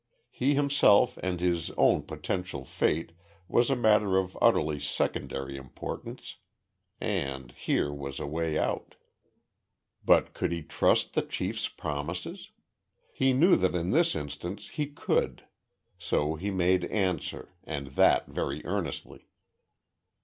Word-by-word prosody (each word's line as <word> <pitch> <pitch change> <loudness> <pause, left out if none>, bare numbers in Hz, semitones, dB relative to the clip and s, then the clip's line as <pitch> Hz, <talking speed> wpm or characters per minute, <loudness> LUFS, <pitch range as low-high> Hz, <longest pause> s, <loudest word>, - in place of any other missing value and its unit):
He 140 +3 +1
himself 140 -5 +4
and 90 -1 -2
his 85 -2 0
own - - +4
potential 90 -7 -4
fate 80 +5 0 0.4
was 120 +5 +3
a 135 - +3
matter 105 -5 +3
of 95 -1 -1
utterly 75 -1 +3
secondary 70 -1 -2
importance 65 -2 -7 0.6
and, 65 -3 -2
here 70 +3 -1
was 70 -1 -6
a - - -3
way 80 +1 -1
out. - - -2 1.1
But - - +4
could - - -1
he 85 -2 -3
trust - - +2
the - - +2
chief's - - -3
promises? 75 +4 -5 0.6
He 135 0 +3
knew 165 +9 +5
that 90 -1 +1
in 85 +1 0
this 170 +3 +3
instance 85 +8 -5
he 150 -2 -2
could. 145 - -1 0.6
So 75 +1 0
he 90 +6 -3
made 90 -1 +2
answer, 95 -4 -2
and 70 -3 -5
that 70 - +4
very 70 +2 -3
earnestly. - - -4
90 Hz, 125 wpm, -29 LUFS, 75-105 Hz, 1.1 s, knew